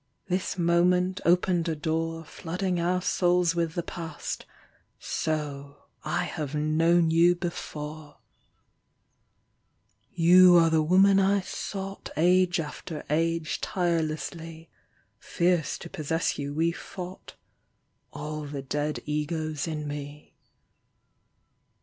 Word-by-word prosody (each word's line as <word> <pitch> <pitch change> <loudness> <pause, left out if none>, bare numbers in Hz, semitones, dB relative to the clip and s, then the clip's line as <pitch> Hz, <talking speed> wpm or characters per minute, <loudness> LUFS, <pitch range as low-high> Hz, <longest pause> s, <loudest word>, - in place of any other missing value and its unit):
This 185 0 -1
moment 180 +2 +2
opened 175 -1 +2
a 160 - -1
door 165 +1 -2
Flooding 180 +3 -3
our 180 +1 0
souls 175 -1 +2
with 170 -1 -1
the 175 - -1
Past: 165 -3 -6 0.5
So 145 -2 -4
— - - -46
I 175 0 -1
have 155 -4 -4
known 165 +2 +3
you 170 +2 +5
before! 155 -3 -6 1.9
You 175 +1 +7
are 165 -1 +5
the 160 -1 +3
woman 190 +5 +5
I 195 +1 +3
sought 195 +1 -6
Age 180 +2 +3
after 150 0 -6
age 165 0 0
tirelessly; 165 -1 -2 0.5
Fierce 175 -2 0
to - - -9
possess 165 -1 -1
you 140 0 -3
we 165 +2 +2
fought 180 +1 -9 0.4
— - - -47
All 150 0 -5
the 140 -1 -6
dead 150 +2 -2
egos 155 0 -2
in 155 -2 -4
me. 145 0 -7
165 Hz, 115 wpm, -27 LUFS, 155-175 Hz, 1.9 s, You